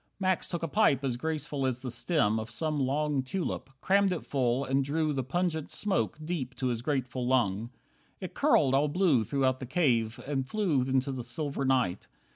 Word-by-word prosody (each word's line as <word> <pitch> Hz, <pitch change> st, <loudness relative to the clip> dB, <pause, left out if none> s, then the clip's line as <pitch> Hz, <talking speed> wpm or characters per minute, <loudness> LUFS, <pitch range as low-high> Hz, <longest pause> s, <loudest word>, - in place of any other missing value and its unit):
Max 185 Hz, -2 st, +1 dB
took 175 Hz, -2 st, -3 dB
a -, -, 0 dB
pipe 150 Hz, -6 st, +3 dB
as 130 Hz, -3 st, 0 dB
graceful 150 Hz, 0 st, -3 dB
as 130 Hz, -1 st, -2 dB
the 125 Hz, -, -4 dB
stem 120 Hz, -4 st, +1 dB
Of 110 Hz, +1 st, -6 dB
some 150 Hz, +5 st, -2 dB
long 140 Hz, +1 st, +1 dB
tulip, 140 Hz, +1 st, -3 dB
crammed 200 Hz, 0 st, +3 dB
it 180 Hz, -, -3 dB
full, 130 Hz, -1 st, 0 dB
and 135 Hz, +1 st, +1 dB
drew 155 Hz, +2 st, 0 dB
The 135 Hz, -2 st, -1 dB
pungent 160 Hz, +2 st, -1 dB
smoke 195 Hz, -6 st, -1 dB
deep 145 Hz, -7 st, -3 dB
to 130 Hz, -, -1 dB
his 115 Hz, -2 st, -2 dB
grateful 130 Hz, -2 st, -2 dB
lung. 115 Hz, -4 st, +1 dB, 0.5 s
It -, -, -6 dB
curled 135 Hz, -, +3 dB
all 140 Hz, +2 st, +3 dB
blue 155 Hz, -, +3 dB
throughout 130 Hz, +2 st, 0 dB
the 130 Hz, -, -6 dB
cave 120 Hz, -7 st, +1 dB
and 135 Hz, -2 st, -2 dB
flew 190 Hz, -11 st, +1 dB
Into 130 Hz, +1 st, 0 dB
the 130 Hz, -2 st, -4 dB
silver 140 Hz, +3 st, -3 dB
night. 125 Hz, -9 st, +1 dB
135 Hz, 190 wpm, -29 LUFS, 125-155 Hz, 0.5 s, pipe